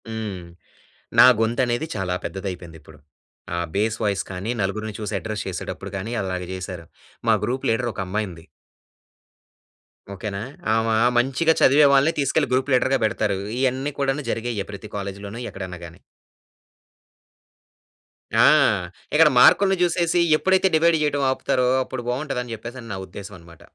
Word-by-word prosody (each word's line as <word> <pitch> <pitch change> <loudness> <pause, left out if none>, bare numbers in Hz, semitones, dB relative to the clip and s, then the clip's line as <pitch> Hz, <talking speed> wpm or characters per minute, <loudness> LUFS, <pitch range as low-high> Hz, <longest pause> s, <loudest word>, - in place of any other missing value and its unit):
హ్మ్. 105 -5 -5 0.7
నా - - +10
గొంతనేది 120 +4 0
చాలా 95 -3 -2
పెద్దదయిపోయిందిప్పుడు. 85 -5 -7 0.6
ఆ - - -2 0.2
బేస్ 110 +2 0
వాయిస్ 100 -2 0
కానీ, 95 +4 -4
నలుగురిని 110 +2 -3
చూసి 105 -1 -4
అడ్రెస్ 110 -2 -5
చేసేటప్పుడు 95 +2 -6
గానీ, 105 +5 -5
అలాగ 95 -1 -3
జేసారు. 90 -2 -6 0.4
మా 110 - +6
గ్రూప్ 125 +4 -2
లీడరొకమ్మాయుంది. 105 -6 -3 1.7
ఓకేనా? 100 +1 -5 0.4
ఆమా 115 0 +1 0.2
మంచిగా 135 +7 +2
చదివే 145 +3 +6
వాళ్ళని 140 +4 +4
తీసుకెళ్ళి 140 0 +1
గ్రూప్ 130 +2 +1
లీడర్‌గా 130 +1 +3
బెడతారు. 105 -2 0 0.2
ఇయన్నీ 130 +2 0
కూడాను 140 +1 0
జరిగేయే 115 -3 -3
ప్రతి 100 +1 -8
కాలేజీలోను 100 +2 -6
ఎక్కడన్నా 95 -2 -7
గానీ. 85 0 -13 2.4
ఆ! - - +7 0.7
ఇక్కడ 150 0 +6
మార్కులుని 195 +7 +6
జూసేసి 175 0 +2 0.2
ఎప్పుడైతే 190 +3 +3
డివైడ్ 165 +1 +4
చెయటం 145 -1 0
ఆపుతారో, 125 -1 0 0.2
అప్పుడు 130 -1 -6
బావుంటదని 125 -2 -3
చెప్పేసని 120 +2 -9
నా - - -4
ఉద్దేశవనమాట. 90 -5 -11
110 Hz, 120 wpm, -23 LUFS, 95-135 Hz, 2.4 s, నా